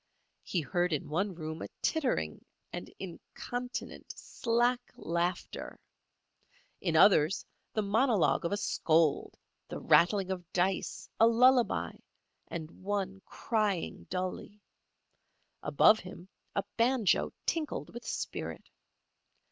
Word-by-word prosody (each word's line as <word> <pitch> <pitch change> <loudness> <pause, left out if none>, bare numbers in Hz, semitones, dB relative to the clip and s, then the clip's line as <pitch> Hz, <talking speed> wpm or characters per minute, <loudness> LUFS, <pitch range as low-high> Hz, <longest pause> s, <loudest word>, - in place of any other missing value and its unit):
He 175 - -1
heard 175 +2 0
in 150 - -2
one 185 +5 -1
room 160 -1 -6
a - - -4 0.2
tittering 250 - 0 0.3
and - - -6
incontinent, 245 +7 -6
slack 240 +2 +1
laughter; 170 +2 -3 1.0
in 170 -4 -1
others 160 0 +5 0.3
the 215 - 0
monologue 220 0 +3
of 170 - -1
a 205 - +1
scold, 160 -6 +1 0.3
the - - -6
rattling 190 +2 +4
of 180 -2 -5
dice, 185 +1 0
a 225 - +7
lullaby, 245 +1 +4 0.6
and 165 0 -7
one 195 -1 -2
crying 210 -6 -1
dully; 185 +3 -4 1.0
above 220 - +5
him 180 0 -10 0.3
a 200 - +1
banjo 235 -3 +3
tinkled 320 -3 -2
with 235 0 -8
spirit. - - -5
195 Hz, 110 wpm, -31 LUFS, 170-230 Hz, 1.0 s, a